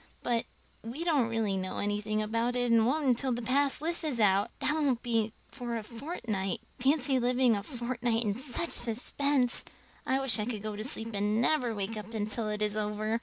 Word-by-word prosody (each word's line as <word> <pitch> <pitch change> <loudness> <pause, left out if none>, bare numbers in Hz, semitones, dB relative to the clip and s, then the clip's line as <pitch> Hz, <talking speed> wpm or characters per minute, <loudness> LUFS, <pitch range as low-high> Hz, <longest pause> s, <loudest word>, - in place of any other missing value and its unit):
But 235 -2 +1 0.4
we 240 +9 -4
don't 290 -9 +2
really 225 -3 0
know 185 0 -3
anything 210 +1 0
about 230 +3 0
it 245 -1 +2
and 225 -1 +5
won't 295 +3 +1
until 260 +1 +3
the 240 0 -2
pass 275 +3 +2
list 335 +2 -1
is 285 -7 -2
out. 200 -1 +4
That 295 - +1
won't 285 -6 +1
be 225 -3 +1 0.2
for 240 -3 -4
a 220 - -5
fortnight. 225 - -3 0.2
Fancy 270 0 +2
living 250 -1 +3
a 200 - -2
fortnight 240 -1 -1
in 210 -2 +1
such 265 +6 -4
suspense! 250 +2 0 0.4
I 265 +1 +2
wish 270 -4 +4
I 210 - 0
could 215 -4 -4
go 215 -1 -3
to 210 - -4
sleep 230 -3 -2
and 210 +2 +1
never 245 -2 +2
wake 205 +2 -3
up 220 +2 -7
until 215 +1 -1
it 210 0 -1
is 210 0 0
over." 215 +1 -1
235 Hz, 200 wpm, -30 LUFS, 215-260 Hz, 0.4 s, and